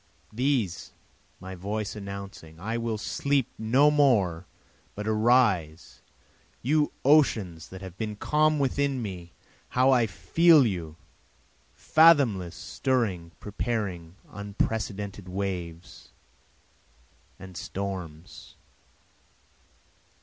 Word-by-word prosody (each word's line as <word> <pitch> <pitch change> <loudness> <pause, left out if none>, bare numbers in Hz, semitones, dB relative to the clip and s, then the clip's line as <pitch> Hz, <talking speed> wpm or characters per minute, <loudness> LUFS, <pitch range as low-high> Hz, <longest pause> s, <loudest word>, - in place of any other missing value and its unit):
These, 120 -7 -1 0.5
my 95 +1 -8
voice 100 +3 -4
announcing 100 -5 -9
I 110 +6 -3
will 115 -2 -2
sleep 140 +4 -1
no 130 +7 +4
more 100 - +2 0.5
but 105 +1 -5
arise, 105 -8 +1 0.6
You 150 +4 +2
oceans 110 - +3
that 95 0 -10
have 95 -1 -10
been 110 -2 -3
calm 155 +7 +2
within 140 -1 0
me! 90 -4 -7 0.4
how 130 +2 +3
I 120 -3 +3
feel 160 - +4
you, 85 -7 -3 0.8
fathomless, 130 - +4
stirring, 95 -6 -2
preparing 100 -6 -4 0.2
unprecedented 100 -1 -4
waves 90 -3 -5 1.3
and 95 -1 -12
storms. 90 -4 -7
105 Hz, 90 wpm, -27 LUFS, 90-130 Hz, 1.3 s, no